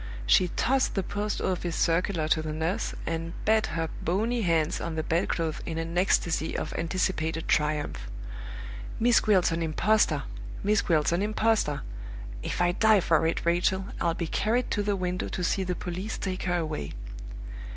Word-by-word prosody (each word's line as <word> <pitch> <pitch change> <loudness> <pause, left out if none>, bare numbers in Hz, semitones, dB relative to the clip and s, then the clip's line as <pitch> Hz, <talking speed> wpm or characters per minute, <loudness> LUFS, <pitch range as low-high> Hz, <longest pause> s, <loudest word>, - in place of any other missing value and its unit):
She 180 - +5
tossed 265 +1 +2
the 195 - +1
Post 205 +2 -2
office 175 -2 -1
circular 170 -1 +1
to 160 - +3
the 155 0 -4
nurse, 160 +4 -2
and 165 0 -3
beat 220 0 +3
her 165 0 -2
bony 225 +7 0
hands 165 -4 +1
on 165 -1 -3
the 160 - -1
bedclothes 165 -1 0
in 160 - -4
an 165 +1 -3
ecstasy 175 -3 +1
of - - -3
anticipated 165 -2 -1
triumph. 150 -1 0 0.9
"Miss 235 +1 +5
Gwilt's 190 -5 +3
an 165 +1 -1
impostor! 195 +7 +2 0.4
Miss 210 0 +3
Gwilt's 155 -4 +2
an 170 +2 +1
impostor! 215 -7 +1 0.6
If - - -3
I 175 - +3
die 215 +2 +5
for 160 -1 +3
it, 165 - -1
Rachel, 180 +3 +1
I'll 170 -1 +1
be 170 - -2
carried 225 +9 0
to 205 - +1
the 205 0 0
window 180 -1 -2
to 180 - -4
see 190 +2 +1
the 180 -1 -2
police 185 +5 -4
take 185 -1 -3
her 175 -1 +1
away!" 155 - -3
175 Hz, 170 wpm, -28 LUFS, 165-200 Hz, 0.9 s, She